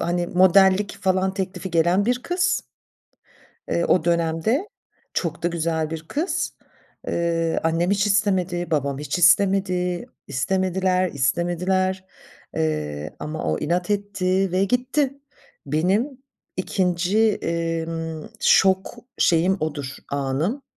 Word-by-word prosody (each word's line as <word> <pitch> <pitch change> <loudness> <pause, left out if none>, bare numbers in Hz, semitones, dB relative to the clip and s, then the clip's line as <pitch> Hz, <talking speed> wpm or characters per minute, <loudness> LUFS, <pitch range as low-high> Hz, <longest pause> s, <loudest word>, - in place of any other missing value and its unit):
hani, 175 0 0
modellik 190 +2 +4
falan 190 0 +1
teklifi 190 -1 -4
gelen 175 +5 +2
bir 250 0 0
kız, 355 0 0 1.1
eee, 170 - +1
o 175 -2 +2
dönemde. 170 - +1 0.5
Çok 165 -1 -2
da - - +3
güzel 160 -2 -1
bir 160 0 -5
kız. 320 +6 -2 0.5
Eee, 165 -1 0
annem 165 +3 +1
hiç 205 +1 +2
istemedi, 190 -4 +1
babam 140 -2 0
hiç 150 +4 -2
istemedi. 180 +1 +3 0.2
İstemediler, 185 +5 0
istemediler, 180 +7 0 0.5
eee, 75 -1 -2
ama 155 +1 -5
o 80 - 0
inat 175 +4 -1
etti 195 -2 0
ve 185 +2 +2
gitti. 260 +4 0 0.5
Benim 185 - +1 0.5
2’nci, 185 +3 +1
emm, 165 -2 -3
şok 190 +4 +3 0.2
şeyim 180 +3 +3
odur, 145 -3 -4
anım 140 - -1
180 Hz, 110 wpm, -23 LUFS, 165-190 Hz, 1.1 s, modellik